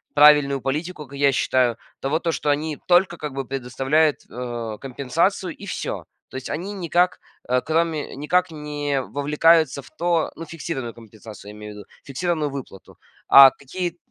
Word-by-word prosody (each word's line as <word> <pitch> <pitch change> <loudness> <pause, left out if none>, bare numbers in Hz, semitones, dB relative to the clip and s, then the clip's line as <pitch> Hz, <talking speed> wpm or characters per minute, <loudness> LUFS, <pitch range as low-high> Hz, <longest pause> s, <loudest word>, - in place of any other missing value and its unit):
правильную 145 -2 +6
политику, 150 +4 -3
как 140 +2 -10
я 140 -1 +4
считаю, 125 -3 +1 0.2
того, 145 +4 0
то, 170 -1 -1
что 150 - -2
они 150 +1 0
только 175 -1 +4
как 150 -3 -6
бы 135 0 -4
предоставляют, 135 +4 +1
э, 120 -3 -5
компенсацию- 155 +8 -1
и 200 - -11
всё. - - -4 0.2
То - - -7
есть 130 - -7
они 180 +7 -4
никак, 180 -1 +1 0.3
э, 125 0 +2
кроме 160 -1 -1
никак 165 +6 +1
не 145 -2 -2
вовлекаются 150 +2 +2
в - - -17
то 170 -1 0
ну, 165 - -7
фиксированную 145 -7 -5
компенсацию, 110 -2 -12
я - - -13
имею 105 0 -8
в - - -13
виду, 105 - -11 0.2
фиксированную 150 +1 -2
выплату. 135 -8 -9 0.3
А 135 -1 +10
какие 175 +7 -5
145 Hz, 165 wpm, -23 LUFS, 130-165 Hz, 0.3 s, А